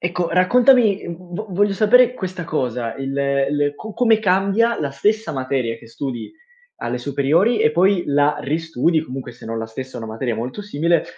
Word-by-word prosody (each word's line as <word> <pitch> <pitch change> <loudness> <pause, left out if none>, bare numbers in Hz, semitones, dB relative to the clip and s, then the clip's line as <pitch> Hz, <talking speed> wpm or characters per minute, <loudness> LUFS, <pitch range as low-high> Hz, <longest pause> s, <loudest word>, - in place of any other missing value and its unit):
Ecco, 175 0 -1
raccontami 225 +3 +4
v 175 +4 -7
voglio 200 +2 +2
sapere 240 +5 +4
questa 185 -5 -5
cosa, 125 -7 -2
il 135 0 -4 0.4
il 145 0 0
co 220 +8 -9
come 225 -3 +3
cambia 200 +4 +2
la 145 -2 -2
stessa 210 +11 0
materia 130 -4 -2
che 115 0 -16
studi 120 -1 -5 0.5
alle 125 +1 -3
superiori 145 - +1
e 150 - +3
poi 185 +2 +3
la 145 +1 +2
ristudi 160 +1 0
comunque 130 -4 -7
se 120 - -15
non 115 0 -4
la 115 - -4
stessa 130 +4 -8
è 120 - -5
una 110 -1 -6
materia 115 0 -2
molto 125 - -5
simile, 170 -3 0
165 Hz, 175 wpm, -20 LUFS, 130-200 Hz, 0.5 s, raccontami